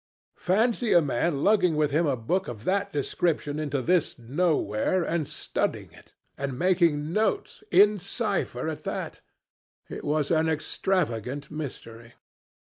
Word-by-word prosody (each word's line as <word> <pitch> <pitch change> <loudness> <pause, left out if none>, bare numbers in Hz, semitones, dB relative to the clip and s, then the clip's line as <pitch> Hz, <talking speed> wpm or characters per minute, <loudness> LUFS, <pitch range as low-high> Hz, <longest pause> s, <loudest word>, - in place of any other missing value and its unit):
Fancy 225 +5 +2
a 175 - +7
man 145 0 0
lugging 190 -6 +3
with 150 -1 +1
him 160 +3 +2
a 140 - +1
book 180 +12 -1
of 110 -3 -7
that 200 +5 0
description 150 +1 -1
into 145 -3 -2
this 175 +1 +1
nowhere 145 - 0
and 165 -3 -1
studying - - -2
it - - -18 0.3
and 135 -2 -3
making 170 -3 +2
notes 220 - -1
in 210 0 +5
cipher 195 - -2
at 160 -1 -5
that! - - -5 0.7
It - - -7
was 150 0 0
an 160 0 +3
extravagant 145 - -1
mystery. 120 -6 -7
155 Hz, 135 wpm, -26 LUFS, 140-185 Hz, 0.7 s, a